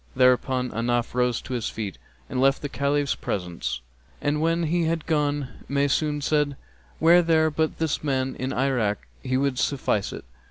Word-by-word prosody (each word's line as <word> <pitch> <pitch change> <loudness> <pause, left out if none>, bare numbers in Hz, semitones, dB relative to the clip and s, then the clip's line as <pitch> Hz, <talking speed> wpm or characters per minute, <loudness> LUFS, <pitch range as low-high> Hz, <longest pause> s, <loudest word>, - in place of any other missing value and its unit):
Thereupon 125 0 +3
Ahnaf 120 +1 0
rose 125 -1 +1
to 130 - -6
his 120 -3 -1
feet 105 -4 -5 0.3
and 125 - -2
left 135 +1 +3
the 145 - -2
Caliph's 140 0 +1
presence, 85 -9 -3 0.4
and 150 +1 0
when 165 +1 +2
he 170 +1 +1
had 160 -1 -1
gone 145 -3 0 0.2
Maysun 145 +1 +1
said, 145 -2 +1 0.4
'Were 170 +2 +7
there 160 -2 +3
but 155 +1 0
this 160 -2 -1
man 130 -2 0
in 130 +1 -2
Irak, 125 -6 0
he 130 0 0
would 135 -1 0
suffice 125 -7 0
to - - -6
it.' - - -10
140 Hz, 170 wpm, -25 LUFS, 125-150 Hz, 0.4 s, Were